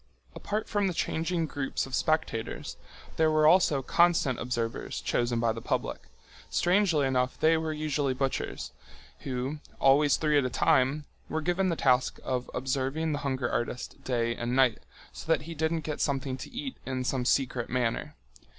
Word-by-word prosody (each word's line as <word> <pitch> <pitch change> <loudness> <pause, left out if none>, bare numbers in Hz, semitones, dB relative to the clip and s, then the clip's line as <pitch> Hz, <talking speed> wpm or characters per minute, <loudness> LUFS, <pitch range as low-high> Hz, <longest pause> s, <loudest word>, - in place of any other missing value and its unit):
Apart 210 +1 -3
from 205 -1 +1
the 180 - -2
changing 165 +1 -1
groups 145 -3 -2
of 135 - -11
spectators 155 -6 -1 0.4
there 160 -1 +4
were 155 0 +3
also 155 -4 +5
constant 170 -6 +3
observers 115 -2 -3
chosen 120 -1 0
by 115 -1 +2
the 115 +1 -5
public—strangely 175 - -1
enough 130 -1 0
they 160 +1 +4
were 160 0 -1
usually 150 -3 -1
butchers—who, 130 - -5 0.2
always 140 +1 +5
three 150 -2 +3
at - - +1
a 125 - 0
time, 135 +4 +2 0.2
were 160 - -1
given 180 +4 +1
the 170 - 0
task 130 -4 +2
of 125 -1 -2
observing 135 +5 -1
the 145 - -1
hunger 130 -2 -1
artist 120 0 -3
day 115 -2 0
and 120 +1 -2
night, 130 -3 +4 0.3
so 165 - -5
that 160 - +2
he 165 +2 -7
didn't 160 +1 0
get 150 -1 -4
something 135 -2 -1
to 130 - -8
eat 260 +1 -5
in 130 -1 -3
some 125 0 -1
secret 125 -2 0
manner. 120 -2 -1
140 Hz, 160 wpm, -29 LUFS, 125-160 Hz, 0.4 s, also